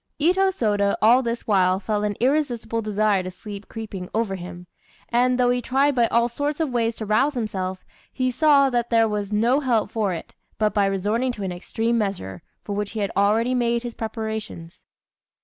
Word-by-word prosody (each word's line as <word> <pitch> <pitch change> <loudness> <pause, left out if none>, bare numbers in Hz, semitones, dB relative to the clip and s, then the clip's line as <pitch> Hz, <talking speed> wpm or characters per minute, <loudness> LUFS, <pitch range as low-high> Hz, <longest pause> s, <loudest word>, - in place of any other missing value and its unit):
Itô 370 +5 +3
Sôda 205 - +1
all 235 +4 +5
this 235 -1 -3
while 185 -3 +3
felt 210 +1 -1
an 205 -1 -1
irresistible 245 -3 0
desire 210 -2 +1
to 185 - -5
sleep 200 +2 -9
creeping 205 -5 -7
over 220 -3 0
him, 180 -1 -8 0.4
and, 250 +1 +2
though 245 0 +4
he 245 0 0
tried 275 +4 +2
by 240 -3 +3
all 235 +1 +2
sorts 285 +5 -3
of 315 -5 0
ways 230 -2 0
to 220 - -6
rouse 265 +8 +2
himself, 190 -5 -3 0.3
he 255 -1 -1
saw 280 -1 +4
that 240 -1 0
there 225 -1 +4
was 210 -1 -3
no 235 +6 +3
help 245 -6 0
for 215 -4 0
it, 170 - -6 0.2
but 215 -1 +1
by 200 -1 +2
resorting 210 +6 0
to 205 - -6
an 190 - -2
extreme 225 +6 -1
measure, 190 - -3 0.2
for 205 - -5
which 205 +1 -3
he 220 - -4
had 200 -1 -1
already 215 +5 +2
made 235 -1 +1
his 240 -1 -5
preparations. 220 -6 -6
225 Hz, 195 wpm, -23 LUFS, 200-245 Hz, 0.4 s, all